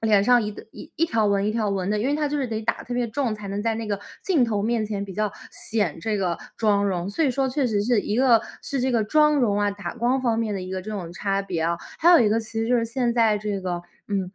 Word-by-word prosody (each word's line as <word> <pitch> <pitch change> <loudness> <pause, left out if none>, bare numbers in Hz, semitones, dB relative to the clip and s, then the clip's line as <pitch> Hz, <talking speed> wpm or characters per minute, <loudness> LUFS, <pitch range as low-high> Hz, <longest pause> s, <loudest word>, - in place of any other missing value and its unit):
脸 210 -3 +4
上 245 +3 +5
一 210 -1 -4 0.2
一 - - -11
一 330 - +3
条 225 -6 +1
纹 200 -1 +2
一 - - +1
条 220 -2 0
纹 195 -1 -1
的， 210 - +1
因 225 - 0
为 285 - +1
它 300 -1 0
就 295 - -2
是 270 - -1
得 220 -2 -3
打 215 - +1
得 - - -9
特 245 - -5
别 245 -1 0
重， 240 -2 -1
才 210 -1 -8
能 200 +1 -3
在 225 0 0
那 225 0 -4
个 205 -1 -1 0.2
镜 325 -10 +3
头 210 -3 -1
面 225 0 0
前 205 -2 -3
比 195 - -8
较 210 0 -1 0.2
显 205 -9 -1
这 215 +4 -1
个 180 -4 -1 0.2
妆 205 -2 +2
容。 185 -1 -2
所 315 +11 0
以 275 - +3
说 265 +1 0
确 265 +1 0
实 210 -4 +1
是 235 0 +2
一 205 - -3
个 245 -3 +5 0.2
是 275 - -2
这 260 +1 +1
个 230 -2 +2
妆 300 +6 +4
容 220 -7 +2
啊， 205 0 +2
打 200 -3 -6
光 245 +3 +1
方 230 -3 +1
面 220 -2 -1
的 195 - -3
一 185 - -7
个 190 0 -3
这 205 +4 -7
种 180 -5 -5
差 195 +2 -1
别 185 -4 -3
啊， 170 +1 +1 0.2
还 335 - +4
有 345 - +8
一 225 - +4
个 220 +2 +2
其 220 0 -9
实 225 - -1
就 250 - +4
是 230 - +1
现 240 0 0
在 225 -3 +3
这 205 -1 -3
个， 175 -2 -3 0.3
嗯， 195 -3 -1
215 Hz, 320 characters per minute, -24 LUFS, 200-245 Hz, 0.3 s, 有